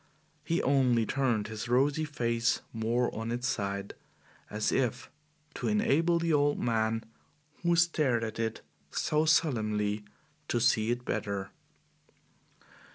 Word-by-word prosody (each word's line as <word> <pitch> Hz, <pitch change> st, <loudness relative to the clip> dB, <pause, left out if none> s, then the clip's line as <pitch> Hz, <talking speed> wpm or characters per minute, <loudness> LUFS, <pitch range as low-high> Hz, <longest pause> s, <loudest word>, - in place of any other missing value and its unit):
He 165 Hz, +3 st, 0 dB
only 125 Hz, -4 st, +3 dB
turned 120 Hz, -4 st, 0 dB
his 110 Hz, +1 st, -6 dB
rosy 140 Hz, +5 st, +2 dB
face 120 Hz, -5 st, 0 dB
more 115 Hz, +2 st, 0 dB
on 115 Hz, +1 st, -4 dB
its 120 Hz, +2 st, -2 dB
side, 100 Hz, -5 st, -2 dB, 0.6 s
as 105 Hz, 0 st, -1 dB
if 125 Hz, -2 st, -1 dB, 0.4 s
to -, -, -3 dB
enable 210 Hz, -6 st, +2 dB
the 165 Hz, -1 st, 0 dB
old 145 Hz, 0 st, +3 dB
man 115 Hz, -1 st, 0 dB, 0.6 s
who 170 Hz, 0 st, +2 dB
stared 155 Hz, -8 st, +2 dB
at 110 Hz, 0 st, -5 dB
it 115 Hz, -1 st, -2 dB, 0.3 s
so 155 Hz, +1 st, 0 dB
solemnly 110 Hz, -9 st, +1 dB, 0.4 s
to 120 Hz, -, 0 dB
see 115 Hz, -2 st, +2 dB
it 120 Hz, +1 st, -2 dB
better. 100 Hz, -1 st, -3 dB
120 Hz, 125 wpm, -30 LUFS, 110-145 Hz, 0.6 s, only